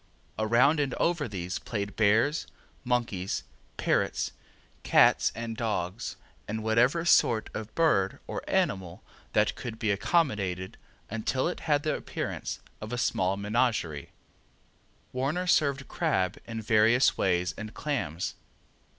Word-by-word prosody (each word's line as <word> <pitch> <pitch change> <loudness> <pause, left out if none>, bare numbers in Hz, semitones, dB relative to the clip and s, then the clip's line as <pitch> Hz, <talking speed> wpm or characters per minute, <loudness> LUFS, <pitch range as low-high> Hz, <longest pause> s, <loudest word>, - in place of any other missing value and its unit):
Around 120 +8 +4
and 140 -3 0
over 165 -5 +1
these 90 -4 -4
played 100 -3 -4
bears, 110 +8 +3 0.4
monkeys, 120 -7 -1 0.3
parrots, - - 0 0.5
cats, - - +5
and 115 0 -4
dogs, 110 -2 -2 0.3
and 110 +1 -3
whatever 125 +9 +3
sort 115 -9 +4
of 110 0 -6
bird 100 -13 +2
or - - -4
animal 90 -2 0 0.3
that - - +3
could 115 -2 -6
be 110 -2 0
accommodated 100 - 0 0.3
until 115 +6 -1
it 175 - -3
had 145 -1 +3
the 155 - +1
appearance - - -4 0.2
of 110 +1 -6
a 125 - -2
small 95 -5 +1
menagerie. 105 - 0 1.0
Warner 140 +8 -1
served 140 -6 +2
crab 95 - 0
in 115 -1 -5
various 110 +4 +4
ways 90 -2 +1
and 110 0 -7
clams. 115 - -2
110 Hz, 125 wpm, -28 LUFS, 100-135 Hz, 1.0 s, cats